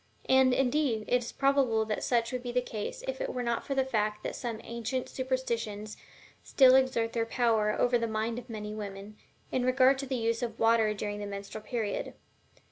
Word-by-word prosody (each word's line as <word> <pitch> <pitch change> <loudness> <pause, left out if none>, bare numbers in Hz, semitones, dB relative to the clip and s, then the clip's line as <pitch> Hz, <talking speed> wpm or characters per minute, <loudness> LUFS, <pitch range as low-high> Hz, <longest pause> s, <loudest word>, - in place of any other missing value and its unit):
And, 260 0 +5
indeed, 255 -3 +1
it 250 0 +2
is 235 - -6
probable 270 -5 +2
that 215 -1 -3
such 235 -1 +1
would 250 -1 -3
be 245 -1 -4
the 250 - +2
case 245 - -5 0.3
were 250 - -3
it - - -2
not 235 -1 -1
for 275 - -3
the 265 -1 +2
fact 215 -4 -1
that - - -4
some 235 -4 -4
ancient 235 +2 -3
superstitions 230 -5 -3 0.5
still 260 -2 +5
exert 260 -3 +2
their 230 -1 0
power 225 -3 +2
over 245 -1 +3
the 230 - -1
mind 220 +2 -2
of 245 0 -14
many 210 -1 -5
women, 205 0 -7 0.4
in 255 - 0
regard 260 +1 +4
to 275 - -4
the 260 - -2
use 230 0 0
of 230 -2 -3
water 225 -2 +3
during 205 0 -4
the 205 - -4
menstrual 200 +2 -7
period. 220 -4 -3
235 Hz, 200 wpm, -30 LUFS, 215-255 Hz, 0.5 s, And